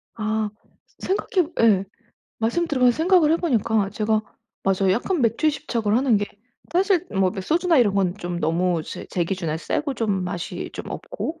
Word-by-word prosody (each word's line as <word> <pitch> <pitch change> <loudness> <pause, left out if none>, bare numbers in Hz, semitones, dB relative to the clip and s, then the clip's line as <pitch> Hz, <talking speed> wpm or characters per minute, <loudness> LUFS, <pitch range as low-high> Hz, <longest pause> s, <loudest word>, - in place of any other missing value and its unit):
아 215 -1 -1 0.5
생각해 370 -3 0
예 200 -4 +4 0.5
말씀 235 +10 0
들으면서 250 -5 +3
생각을 325 -2 +4
해 - - +4
보니까 225 - +1
제가 215 0 +1 0.4
맞아요 190 0 +2
약간 320 - 0
맥주에 230 +7 +2
집착을 235 -7 -1
하는 250 -4 +3
게 205 0 -1 0.5
사실 370 -1 +2
뭐 190 -2 +2
매 200 - -5
소주나 330 - +2
이런 205 -5 +3
건 185 -3 +1
좀 175 -2 -4
너무 170 +1 +1
제 - - -8
제 175 -2 0
기준에 165 -4 -2
세고 285 - -2
좀 200 -6 -1
맛이 180 -1 -5
좀 - - -7
없고 330 -10 -5
220 Hz, 315 characters per minute, -23 LUFS, 195-310 Hz, 0.5 s, 예